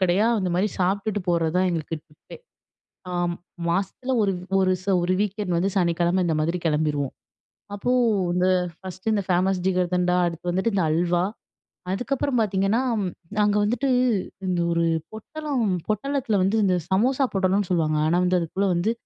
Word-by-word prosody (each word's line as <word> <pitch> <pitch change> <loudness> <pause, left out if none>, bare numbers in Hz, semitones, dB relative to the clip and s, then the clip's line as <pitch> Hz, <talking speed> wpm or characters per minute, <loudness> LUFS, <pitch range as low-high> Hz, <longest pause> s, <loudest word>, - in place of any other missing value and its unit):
கடையா 185 +4 +3
அந்தமாரி 185 +2 0
சாப்பிட்டுட்டு 200 +3 0
போறதுதான் 170 +2 +2
எங்களுக்கு 165 -1 -3
டிப்பே! 150 -1 -14 0.7
ஆம் 175 -1 -1 0.3
மாசத்துல 195 +8 -1
ஒரு 200 -2 +2 0.3
ஒரு 185 0 +3
ச - - -19 0.2
ஒரு 185 +1 +1
வீக்கெண்ட் 205 -3 -1
வந்து 190 +3 +1
சனிக்கிழம 175 +1 +2
இந்த 160 -2 +1
மாதிரி 170 +3 0
கிளம்பிருவோம். 150 -3 0 0.6
அப்போ 225 +5 -2 0.4
இந்த 180 +1 +2 0.3
1ஸ்ட் 190 +3 -4
இந்த 205 - +1
ஃபேமஸ் 185 +1 +2
ஜிகர்தண்டா, 180 -1 +1
அடுத்து 170 +1 -3
வந்துட்டு 190 +6 0
இந்த 185 -4 +2
அல்வா, 175 +2 +1 0.7
அதுக்கப்பறம் 250 +4 -1
பார்த்தீங்கன்னா, 200 +3 +1 0.6
அங்க 205 0 +2
வந்துட்டு 240 +6 0 0.6
இந்த 180 -1 0
ஒரு 170 0 +1 0.3
பொட்டலம் 280 +1 -3 0.2
பொட்டலத்தில 240 +1 0
வந்து 195 +4 +1
இந்த 185 - +3 0.2
சமோசா 255 +8 +2
பொட்டலம்னு 195 0 +1
சொல்லுவாங்க. 155 -3 +1
ஆனா, 170 - +2
வந்து 180 0 +2
அதுக்குள்ள 185 +4 -1
வந்து 175 +6 +1
185 Hz, 140 wpm, -24 LUFS, 175-205 Hz, 0.7 s, கடையா